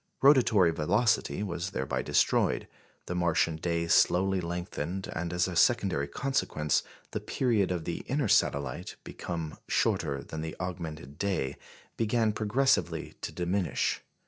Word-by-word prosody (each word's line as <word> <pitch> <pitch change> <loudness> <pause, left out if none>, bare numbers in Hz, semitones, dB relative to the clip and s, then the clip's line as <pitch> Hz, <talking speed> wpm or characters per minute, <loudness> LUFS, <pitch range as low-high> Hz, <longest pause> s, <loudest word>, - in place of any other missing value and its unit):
Rotatory 120 - +6
velocity 100 +6 +1
was 90 -2 -3
thereby 65 -6 -2
destroyed, - - +2 0.4
the - - -4
Martian 85 -2 +1
day 85 0 -1
slowly 95 +2 +3
lengthened, 85 +1 -4
and, 85 0 -2
as 90 +1 +1
a 90 - -5
secondary 90 -8 +3
consequence, 75 - 0 0.3
the - - -2
period 115 -7 +1
of 85 -3 -2
the 85 - -2
inner 135 -2 0
satellite, 70 -8 +1
become 80 -3 -5
shorter 70 -1 0
than 80 +2 -6
the 80 0 -5
augmented 80 -6 -6
day, 95 -10 -1 0.4
began 115 0 +2
progressively 115 +6 +1
to - - -4
diminish. 90 -1 -1
90 Hz, 130 wpm, -29 LUFS, 80-105 Hz, 0.4 s, Rotatory